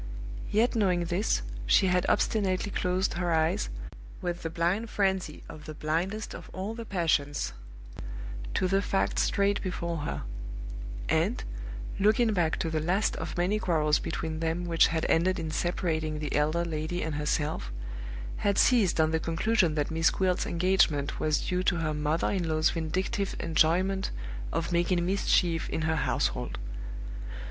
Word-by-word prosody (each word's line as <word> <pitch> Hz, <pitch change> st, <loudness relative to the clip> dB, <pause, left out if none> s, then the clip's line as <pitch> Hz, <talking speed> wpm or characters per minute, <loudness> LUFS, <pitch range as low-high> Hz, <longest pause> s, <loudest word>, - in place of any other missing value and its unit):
Yet 225 Hz, +4 st, +2 dB
knowing 180 Hz, -5 st, +2 dB
this, 175 Hz, -, 0 dB, 0.2 s
she 125 Hz, -, +5 dB
had 180 Hz, -1 st, +2 dB
obstinately 200 Hz, -2 st, +1 dB
closed 185 Hz, +1 st, 0 dB
her 175 Hz, 0 st, -1 dB
eyes, 160 Hz, -, +2 dB, 0.5 s
with 175 Hz, -1 st, -3 dB
the 165 Hz, -, -3 dB
blind 175 Hz, +7 st, 0 dB
frenzy 190 Hz, -6 st, 0 dB
of 150 Hz, -1 st, -10 dB
the 155 Hz, -, -7 dB
blindest 175 Hz, +9 st, -2 dB
of -, -, -9 dB
all 195 Hz, +4 st, -3 dB
the 230 Hz, 0 st, -6 dB
passions, 155 Hz, -, 0 dB, 1.0 s
to 185 Hz, -, +2 dB
the 195 Hz, +1 st, +2 dB
facts 195 Hz, -1 st, +1 dB
straight 200 Hz, 0 st, +2 dB
before 170 Hz, -3 st, -2 dB
her; 150 Hz, -, -3 dB, 0.8 s
and, -, -, +1 dB, 0.6 s
looking 215 Hz, +3 st, +4 dB
back 170 Hz, -4 st, +1 dB
to 165 Hz, -, -1 dB
the 160 Hz, -, +1 dB
last 180 Hz, +7 st, +1 dB
of -, -, -5 dB
many 185 Hz, +5 st, +2 dB
quarrels 155 Hz, -5 st, +2 dB
between 160 Hz, -1 st, -3 dB
them 165 Hz, +2 st, -1 dB
which 165 Hz, -1 st, +5 dB
had 160 Hz, -1 st, -1 dB
ended 185 Hz, +3 st, +3 dB
in 160 Hz, -2 st, -3 dB
separating 160 Hz, -2 st, -1 dB
the 150 Hz, -1 st, -3 dB
elder 155 Hz, +4 st, +2 dB
lady 160 Hz, +2 st, -2 dB
and 160 Hz, -1 st, -2 dB
herself, 150 Hz, -, -1 dB, 0.7 s
had 200 Hz, -1 st, +1 dB
seized 220 Hz, -10 st, +4 dB
on 160 Hz, 0 st, +4 dB
the 160 Hz, -, +1 dB
conclusion 170 Hz, +1 st, +2 dB
that 150 Hz, 0 st, 0 dB
Miss 160 Hz, 0 st, +3 dB
Gwilt's 185 Hz, -2 st, 0 dB
engagement 170 Hz, -5 st, +2 dB
was 155 Hz, -1 st, +1 dB
due 180 Hz, 0 st, 0 dB
to 185 Hz, -, +2 dB
her 160 Hz, -2 st, -1 dB
mother 150 Hz, +2 st, 0 dB
in 180 Hz, -4 st, -1 dB
law's 155 Hz, 0 st, +3 dB
vindictive 185 Hz, +5 st, -1 dB
enjoyment 175 Hz, +4 st, +2 dB, 0.4 s
of 170 Hz, +2 st, -1 dB
making 175 Hz, 0 st, +2 dB
mischief 180 Hz, -3 st, +2 dB
in 160 Hz, -, -2 dB
her 160 Hz, 0 st, +1 dB
household. 155 Hz, -, 0 dB
170 Hz, 155 wpm, -29 LUFS, 160-190 Hz, 1.0 s, she